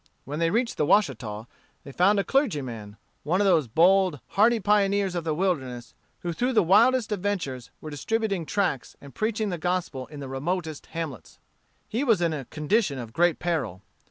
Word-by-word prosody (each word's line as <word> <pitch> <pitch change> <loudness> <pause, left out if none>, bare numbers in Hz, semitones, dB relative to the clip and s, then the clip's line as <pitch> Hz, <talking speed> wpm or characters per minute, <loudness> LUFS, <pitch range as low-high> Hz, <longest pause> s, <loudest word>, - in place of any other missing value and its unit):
When 145 +3 -5
they 165 0 +2
reached 230 +5 0
the 150 - +2
Washita, 115 - +1 0.4
they 140 - -10
found 190 +8 +3
a 200 - +2
clergyman, 130 - -1 0.2
one 170 +6 0
of 205 - +3
those 165 -8 +3
bold, 180 - +3
hardy 225 +3 +3
pioneers 200 -2 +2
of 170 -2 -3
the 155 -2 0
wilderness, 130 -10 -2 0.3
who 175 -1 -3
through 250 +9 0
the 225 - +4
wildest 225 +6 +4
adventures 180 - -3
were 155 - -7
distributing 200 +4 -1
tracts 180 - -1
and 140 -2 -13
preaching 215 -1 -1
the 175 -3 -3
gospel 175 -7 -2
in 150 -1 -10
the 140 - -6
remotest 155 +4 -3
hamlets. 165 -5 -6 0.5
He 235 +6 -1
was 225 -8 +3
in 170 -2 +1
a 140 -4 -5
condition 155 - 0
of 115 -3 -7
great 175 -1 +3
peril. 135 - -2
175 Hz, 180 wpm, -26 LUFS, 140-205 Hz, 0.5 s, the